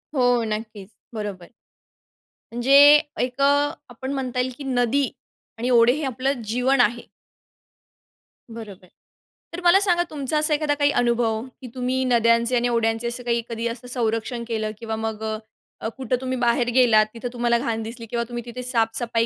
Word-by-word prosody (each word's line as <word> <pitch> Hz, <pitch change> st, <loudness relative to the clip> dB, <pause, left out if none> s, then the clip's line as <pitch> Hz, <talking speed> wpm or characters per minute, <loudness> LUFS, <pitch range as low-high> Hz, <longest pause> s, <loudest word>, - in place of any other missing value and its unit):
हो, 245 Hz, -2 st, +3 dB
नक्कीच, 215 Hz, -2 st, -6 dB, 0.2 s
बरोबर. 205 Hz, -5 st, -6 dB, 1.1 s
म्हणजे 240 Hz, +3 st, 0 dB, 0.5 s
एक 250 Hz, +2 st, -2 dB
अ, -, -, +4 dB, 0.5 s
आपण 260 Hz, +2 st, -6 dB
म्हणता 255 Hz, -2 st, -3 dB
येईल, 250 Hz, +1 st, 0 dB
की 290 Hz, -, -8 dB
नदी 260 Hz, +1 st, +1 dB, 0.5 s
आणि 240 Hz, +2 st, -2 dB
ओढे 240 Hz, 0 st, +5 dB
हे 305 Hz, +3 st, -4 dB
आपलं 265 Hz, 0 st, -2 dB
जीवन 250 Hz, +4 st, +2 dB
आहे. 240 Hz, +1 st, 0 dB, 1.5 s
बरोबर. 200 Hz, -5 st, -10 dB, 0.7 s
तर 345 Hz, -, -5 dB
मला 350 Hz, +2 st, +6 dB
सांगा 355 Hz, -4 st, +2 dB
तुमचा 295 Hz, 0 st, -2 dB
असा 305 Hz, 0 st, +3 dB
एखादा 295 Hz, 0 st, +1 dB
काही 290 Hz, 0 st, +2 dB
अनुभव 235 Hz, -3 st, +1 dB, 0.2 s
की 255 Hz, -, -8 dB
तुम्ही 255 Hz, +1 st, -1 dB
नद्यांचे 235 Hz, 0 st, +3 dB
आणि 240 Hz, 0 st, +2 dB
ओढ्यांचे 225 Hz, 0 st, 0 dB
असं 240 Hz, +1 st, -4 dB
काही 235 Hz, -1 st, 0 dB
कधी 230 Hz, 0 st, -3 dB
असं 235 Hz, +1 st, -6 dB
संरक्षण 235 Hz, 0 st, -2 dB
केलं 220 Hz, -2 st, -2 dB
किंवा 225 Hz, 0 st, -4 dB
मग 220 Hz, -1 st, -4 dB, 0.6 s
अ, -, -, -2 dB
कुठं 255 Hz, -1 st, -1 dB
तुम्ही 260 Hz, 0 st, -3 dB
बाहेर 240 Hz, 0 st, +1 dB
गेलात, 230 Hz, -4 st, +5 dB
तिथं 235 Hz, +1 st, -6 dB
तुम्हाला 240 Hz, -1 st, +1 dB
घाण 230 Hz, -3 st, -2 dB
दिसली 230 Hz, +1 st, -8 dB
किंवा 235 Hz, +1 st, -2 dB
तुम्ही 240 Hz, 0 st, -5 dB
तिथे 245 Hz, +1 st, -7 dB
साफसफाई 230 Hz, -1 st, 0 dB
240 Hz, 160 wpm, -23 LUFS, 230-255 Hz, 1.5 s, मला